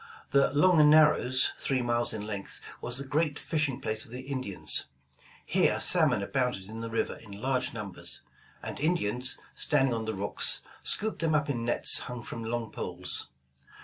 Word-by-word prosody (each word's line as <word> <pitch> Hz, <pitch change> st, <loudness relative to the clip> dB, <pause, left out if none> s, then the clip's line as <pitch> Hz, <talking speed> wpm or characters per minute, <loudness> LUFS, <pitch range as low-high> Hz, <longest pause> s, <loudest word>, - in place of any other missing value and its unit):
The 140 Hz, 0 st, +4 dB
''Long 155 Hz, -1 st, +5 dB
Narrows," 150 Hz, -4 st, +5 dB
three 130 Hz, -2 st, -1 dB
miles 120 Hz, 0 st, +1 dB
in 105 Hz, -1 st, -5 dB
length, 105 Hz, -2 st, -6 dB, 0.2 s
was 125 Hz, -, 0 dB
the 140 Hz, -, -2 dB
great 145 Hz, +1 st, 0 dB
fishing 150 Hz, -5 st, -2 dB
place 110 Hz, -5 st, -2 dB
of -, -, -15 dB
the 125 Hz, +2 st, -7 dB
Indians. 130 Hz, -8 st, -1 dB, 0.6 s
Here -, -, +2 dB
salmon 100 Hz, -, +3 dB
abounded 125 Hz, -3 st, -1 dB
in 110 Hz, +2 st, -8 dB
the 115 Hz, 0 st, -5 dB
river 115 Hz, -, -2 dB
in 100 Hz, -3 st, -11 dB
large 130 Hz, +1 st, -1 dB
numbers, 105 Hz, -5 st, -4 dB, 0.4 s
and -, -, -6 dB
Indians, 130 Hz, -6 st, 0 dB, 0.2 s
standing 135 Hz, -4 st, +1 dB
on 115 Hz, -1 st, -3 dB
the 110 Hz, -1 st, -3 dB
rocks 100 Hz, +1 st, +2 dB, 0.2 s
scooped 215 Hz, -4 st, -1 dB
them 160 Hz, -1 st, +1 dB
up 150 Hz, -1 st, +1 dB
in 120 Hz, -4 st, -3 dB
nets 120 Hz, -, +4 dB
hung 125 Hz, -2 st, -7 dB
from 115 Hz, -1 st, -7 dB
long 115 Hz, 0 st, -3 dB
poles. -, -, +1 dB
125 Hz, 170 wpm, -29 LUFS, 115-145 Hz, 0.6 s, Long